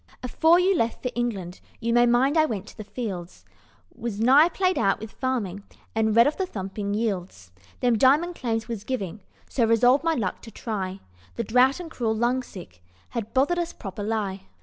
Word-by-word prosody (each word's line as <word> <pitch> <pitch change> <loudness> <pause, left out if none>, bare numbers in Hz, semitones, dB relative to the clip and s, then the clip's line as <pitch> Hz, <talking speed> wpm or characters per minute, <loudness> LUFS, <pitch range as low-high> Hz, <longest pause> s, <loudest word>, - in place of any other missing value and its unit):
"Afore 320 +7 +4
you 375 +2 +3
left 230 -7 -1
for 250 - -1
England, 200 -7 -3 0.2
You 235 0 -1
may 240 0 +5
mind 255 +5 +3
I 315 -1 +4
went 210 -7 -4
to - - -15
the 215 - -7
Fields; 195 -6 -6 0.5
I - - -21
was 230 -4 -3
nigh 275 +8 +6
played 370 +1 0
out 195 -3 +2
with 220 0 -8
farming, 230 -8 -2 0.3
And 220 -1 +1
read 235 +1 +7
of 300 - 0
the 380 - -1
thumping 200 - -4
yields 185 - -3 0.3
Them 240 -3 +2
diamond 300 +8 +4
claims 225 -7 -2
was 230 -4 -5
giving, 210 -5 -4 0.3
so 245 - 0
Resolved 245 +5 +4
my 330 -1 +2
luck 200 -8 -2
to 230 - -11
try, 195 -4 -4 0.3
The 235 - -2
drought 250 - +3
and 340 -2 -8
cruel 225 -6 -1
lungsick 225 - -3 0.3
Had 230 -3 -5
bothered 290 +7 +2
us 345 -1 -3
proper_ly_. 200 0 -3
230 Hz, 190 wpm, -25 LUFS, 205-260 Hz, 0.5 s, read